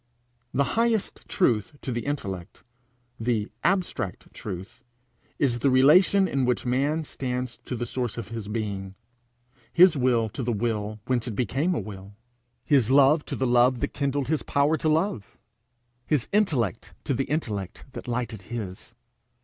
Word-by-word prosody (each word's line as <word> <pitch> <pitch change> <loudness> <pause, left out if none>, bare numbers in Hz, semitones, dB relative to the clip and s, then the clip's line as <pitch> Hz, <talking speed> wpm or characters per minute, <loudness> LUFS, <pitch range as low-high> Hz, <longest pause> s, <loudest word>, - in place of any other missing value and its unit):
The 140 - +2
highest 230 -2 0
truth 120 - +1
to 130 - -3
the 120 +2 -3
intellect, 95 -11 -5 0.6
the 115 -2 -1
abstract 180 - -1
truth, 95 -2 -7 0.6
is 125 -4 +1
the 140 - +3
relation 180 +9 +6
in 135 -5 0
which 125 0 0
man 140 +6 +1
stands 125 -3 -4
to 125 - -3
the 120 0 -3
source 120 -1 -3
of 115 -3 -5
his 115 -3 -6
being 100 -3 -4 0.8
his 175 -1 +7
will 125 -4 +2
to 110 - -6
the 120 -1 -1
will 110 -1 -2
whence 125 -2 0
it 115 - -4
became 135 - 0
a - - 0
will, 100 -1 -9 0.5
his 135 -6 +3
love 140 +3 +5
to - - -4
the 130 - 0
love 125 0 +4
that - - -2
kindled 140 -2 -1
his 155 +1 0
power 140 +3 +2
to 155 - 0
love, 155 - -1 0.7
his 145 -6 +1
intellect 140 - 0
to 140 - -1
the 135 +2 0
intellect 105 - -3
that 130 - -8
lighted 120 -3 -3
his. 100 -3 -7
125 Hz, 155 wpm, -26 LUFS, 110-145 Hz, 0.8 s, his